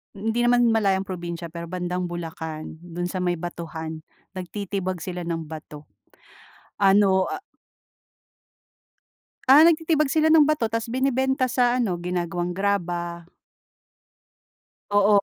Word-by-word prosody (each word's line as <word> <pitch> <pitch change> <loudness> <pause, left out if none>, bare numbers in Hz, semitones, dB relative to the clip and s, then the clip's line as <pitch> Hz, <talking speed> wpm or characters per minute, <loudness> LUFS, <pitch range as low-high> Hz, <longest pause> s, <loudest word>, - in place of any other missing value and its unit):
hindi 220 +4 -1
naman 240 -1 +4
malayong 195 -3 +2
probinsiya 170 -2 -5
pero 170 0 -6
bandang 180 0 -3
Bulacan, 160 -2 -6
do'n 175 0 -6
sa 185 +1 -4
may 175 -1 +1
batuhan. 160 -2 -6 0.4
Nagtitibag 185 0 -4
sila 180 -1 -5
ng 165 -1 -2
bato. 150 -1 -10 0.9
Ano 195 -1 +4
ah - - -5 2.1
Ah, 290 +4 +9
nagtitibag 320 -3 +3
sila 315 0 +3
ng 315 -2 +7
bato, 300 -6 +1
'tas 230 +1 -3
binebenta 265 0 +1
sa 245 0 +2
ano, 190 -7 0
ginagawang 175 0 -2
graba. 175 -3 -2 1.7
Oo 205 0 +4
185 Hz, 115 wpm, -24 LUFS, 175-235 Hz, 2.1 s, Ah